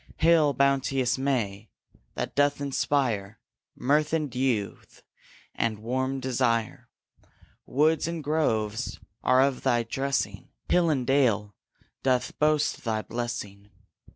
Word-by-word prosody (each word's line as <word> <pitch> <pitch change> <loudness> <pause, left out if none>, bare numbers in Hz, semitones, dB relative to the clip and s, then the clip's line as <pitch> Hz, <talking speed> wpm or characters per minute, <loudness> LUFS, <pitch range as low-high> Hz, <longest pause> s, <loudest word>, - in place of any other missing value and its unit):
Hail, 160 -3 +4
bounteous 135 -1 +1
May, 110 -7 -1 0.5
that - - -3
doth 145 0 +2
inspire 130 -7 -1 0.4
Mirth 150 +4 +1
and 155 -5 -1
youth 125 -6 -2 0.5
and 115 -2 -1
warm 130 +5 -2
desire! 120 -3 -1 0.8
Woods 155 +4 +2
and 165 -2 -4
groves 110 -8 -1 0.2
are 130 +1 +4
of 135 -2 0
thy 120 -1 +2
dressing, 135 +4 -2 0.2
Hill 175 -2 +3
and 135 -5 0
dale 115 -7 +2 0.5
doth 130 -2 0
boast 150 -1 +1
thy 110 -2 -1
blessing. 105 -4 -5
130 Hz, 110 wpm, -27 LUFS, 115-145 Hz, 0.8 s, Hail